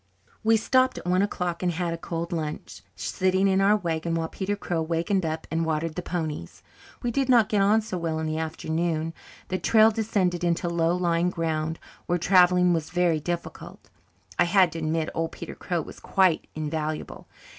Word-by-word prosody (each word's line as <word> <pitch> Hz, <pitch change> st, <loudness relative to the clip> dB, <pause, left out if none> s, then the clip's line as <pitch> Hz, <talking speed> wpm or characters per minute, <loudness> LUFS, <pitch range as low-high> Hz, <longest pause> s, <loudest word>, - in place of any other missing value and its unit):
We 225 Hz, 0 st, +5 dB
stopped 255 Hz, +3 st, +2 dB
at -, -, -8 dB
one 180 Hz, +1 st, +2 dB
o'clock 180 Hz, -4 st, -2 dB
and 180 Hz, -1 st, 0 dB
had 170 Hz, 0 st, -2 dB
a -, -, -2 dB
cold 170 Hz, 0 st, -4 dB
lunch, 155 Hz, -2 st, -5 dB
sitting 190 Hz, +1 st, +1 dB
in 190 Hz, 0 st, +3 dB
our 200 Hz, +2 st, +5 dB
wagon, 165 Hz, -3 st, -2 dB
while 165 Hz, -1 st, -2 dB
Peter 200 Hz, +1 st, -2 dB
Crow 175 Hz, -4 st, -2 dB
wakened 170 Hz, +4 st, 0 dB
up 160 Hz, 0 st, -4 dB
and 165 Hz, 0 st, 0 dB
watered 160 Hz, 0 st, -1 dB
the 180 Hz, -, -4 dB
ponies. 155 Hz, -, -5 dB, 0.4 s
We 240 Hz, -, 0 dB
did 270 Hz, +2 st, 0 dB
not 235 Hz, -4 st, +5 dB
get 205 Hz, -2 st, +2 dB
on 210 Hz, +3 st, +4 dB
so 210 Hz, -4 st, -5 dB
well 165 Hz, -1 st, -2 dB
in 160 Hz, -, -2 dB
the 155 Hz, 0 st, -2 dB
afternoon. 160 Hz, 0 st, -2 dB, 0.4 s
The 185 Hz, -, -1 dB
trail 220 Hz, 0 st, +5 dB
descended 195 Hz, -5 st, 0 dB
into 170 Hz, 0 st, 0 dB
low 170 Hz, 0 st, +1 dB
lying 175 Hz, -1 st, +1 dB
ground 160 Hz, -2 st, -2 dB, 0.3 s
where 175 Hz, -, +1 dB
travelling 180 Hz, 0 st, +5 dB
was 160 Hz, -2 st, -2 dB
very 175 Hz, -3 st, +2 dB
difficult. 170 Hz, +3 st, -6 dB, 0.5 s
I -, -, +6 dB
had 185 Hz, -1 st, +4 dB
to 165 Hz, -, -5 dB
admit 160 Hz, 0 st, -1 dB
old 165 Hz, 0 st, -2 dB
Peter -, -, -7 dB
Crow 175 Hz, -2 st, -2 dB
was -, -, -11 dB
quite 185 Hz, -4 st, +2 dB
invaluable. 155 Hz, 0 st, -4 dB
170 Hz, 190 wpm, -26 LUFS, 160-190 Hz, 0.5 s, I